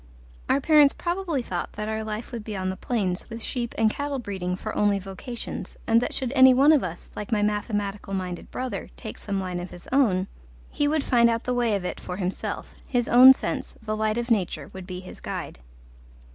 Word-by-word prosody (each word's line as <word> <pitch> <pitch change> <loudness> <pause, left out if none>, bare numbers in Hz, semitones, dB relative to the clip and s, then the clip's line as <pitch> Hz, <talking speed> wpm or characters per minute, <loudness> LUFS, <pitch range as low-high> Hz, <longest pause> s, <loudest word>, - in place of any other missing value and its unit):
Our 275 - +4
parents 295 -1 +5
probably 345 -6 -1
thought 175 -6 -4
that 210 0 -4
our 220 0 -2
life 215 +1 -5
would 235 -3 -5
be 210 -1 -5
on 185 0 -1
the - - -5
plains, 190 -4 -2
with 230 0 -7
sheep 240 -2 -3
and 225 - +4
cattle 285 +5 -2
breeding 190 -6 -3
for 215 +3 -5
only 205 -1 +3
vocations, 195 +5 -6
and 230 0 +4
that - - -1
should 260 -1 -2
any 260 -2 +8
one 280 +4 +6
of 300 -4 +4
us, 175 -1 -6
like 210 - -6
my 210 -2 +2
mathematical 205 -1 -2
minded 180 -2 -4
brother, 255 0 -4
take 220 - -8
some 200 -2 -2
line 180 -2 -3
of 175 +1 -6
his 175 - -12
own, 215 -9 +3 0.5
he 290 - +1
would 305 -1 +1
find 235 -2 +4
out 230 0 0
the 250 - -1
way 240 -3 +2
of 190 -2 -3
it - - -4
for 180 - -6
himself: 185 -1 -4
his 245 -2 0
own 255 +2 +10
sense, 265 - -2
the 215 -1 -3
light 215 +1 0
of 240 0 -2
nature, 200 -6 0
would 190 -1 -8
be 185 -1 -6
his 185 - -11
guide. - - -6
220 Hz, 215 wpm, -25 LUFS, 190-250 Hz, 0.5 s, own